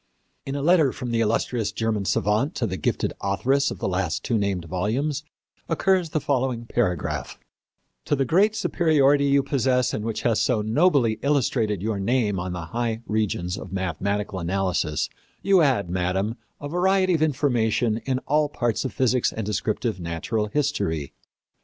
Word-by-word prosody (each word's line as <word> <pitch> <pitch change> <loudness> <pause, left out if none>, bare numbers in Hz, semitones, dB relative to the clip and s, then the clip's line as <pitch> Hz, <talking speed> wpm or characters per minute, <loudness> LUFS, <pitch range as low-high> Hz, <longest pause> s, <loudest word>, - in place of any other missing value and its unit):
In 135 - -3
a 140 - -2
letter 160 -4 +4
from 125 -1 -5
the 115 - +1
illustrious 115 0 0
German 110 -2 -1
savant 105 - +1
to 120 - -1
the 95 -4 -3
gifted - - -1
authoress 135 +9 +1
of - - -6
the - - -4
two 95 - 0
last 90 +3 -2
named 100 -6 0
volumes 120 - -1 0.5
occurs 180 +1 +2
the 155 - 0
following 130 -4 -1
paragraph: 100 -9 -2 0.7
"To - - +1
the 135 -1 0
great 200 - +3
superiority 145 -8 +3
you 140 0 +3
possess 125 -2 +1
and 105 - -2
which 115 -1 -3
has 115 -2 +2
so 115 -5 +1
nobly 120 -2 +2
illustrated 120 -8 +1
your 110 -2 -1
name 105 -2 +1
on 90 +1 -3
the 90 -2 -5
high 115 +4 -3
regions 100 -4 -1
of 95 - -9
mathematical 95 +2 -2
analysis, 90 -3 -1 0.4
you 195 -1 +5
add, 130 - +2
Madam, 95 +4 -1 0.2
a 145 - -5
variety 185 +3 +2
of 160 - +1
information 120 -6 +1
in 130 -1 0
all 150 0 +2
parts 120 -5 -1
of 130 - -3
physics 130 -1 +2
and 110 - -4
descriptive 105 +1 -2
natural 85 +6 -2
history. 105 - -1
115 Hz, 165 wpm, -24 LUFS, 100-140 Hz, 0.7 s, you